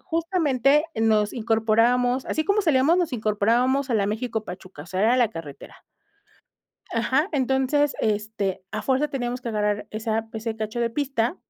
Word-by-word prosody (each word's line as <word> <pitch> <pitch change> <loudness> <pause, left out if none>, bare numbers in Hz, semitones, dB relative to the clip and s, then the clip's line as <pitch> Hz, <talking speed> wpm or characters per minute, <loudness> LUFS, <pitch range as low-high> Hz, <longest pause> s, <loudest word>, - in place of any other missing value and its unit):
justamente 315 -5 +1
nos 215 -2 +2
incorporábamos, 235 +3 +2
así 315 - -1
como 405 +4 +2
salíamos, 310 0 +3
nos 335 -6 0
incorporábamos 235 +5 +1
a - - +1
la 200 -2 +2
México-Pachuca, 210 -7 -5
o 160 - -14
sea, 185 +2 -3
era 235 +4 +4
la 240 -3 +3
carretera. 160 -6 -10 1.1
Ajá, 260 +8 +1
entonces, 265 +1 +1
este, 210 -3 -1
a 215 - -3
fuerza 270 +3 +1
teníamos 245 -2 -3
que 240 - -5
agarrar 210 -1 -1
esa 220 0 -2
pues, 220 +1 -8
el 225 -1 -2
cacho 220 +2 -4
de 235 - 0
pista 270 +2 -1
235 Hz, 155 wpm, -24 LUFS, 215-270 Hz, 1.1 s, era